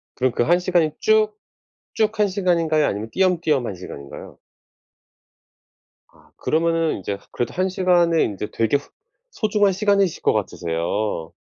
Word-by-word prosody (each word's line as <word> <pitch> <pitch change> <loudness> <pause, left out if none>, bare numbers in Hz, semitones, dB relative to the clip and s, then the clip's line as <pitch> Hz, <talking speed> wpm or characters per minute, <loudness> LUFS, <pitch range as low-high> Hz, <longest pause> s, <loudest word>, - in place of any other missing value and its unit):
그럼 130 -1 +1
그 120 - 0
1 175 +5 +3
시간이 175 -4 +1
쭉 435 0 +3 0.6
쭉 220 0 0
한 210 - +4
시간인가요? 170 -5 +1
아니면 105 +3 -3
띄엄띄엄 165 -9 +1
1 100 - -5
시간인가요? 70 -6 -10 1.7
아 - - -25
그러면은 165 0 0
인제 100 +1 -4
그래도 120 -1 -3
1 185 +1 0
시간에 175 -3 +3
인제 105 0 -4
되게 115 +5 +1
후 145 - -14 0.4
소중한 210 - +1
시간이실 200 -3 +1
것 - - +4
같으세요. 85 -2 -2
165 Hz, 295 characters per minute, -22 LUFS, 110-190 Hz, 1.7 s, 한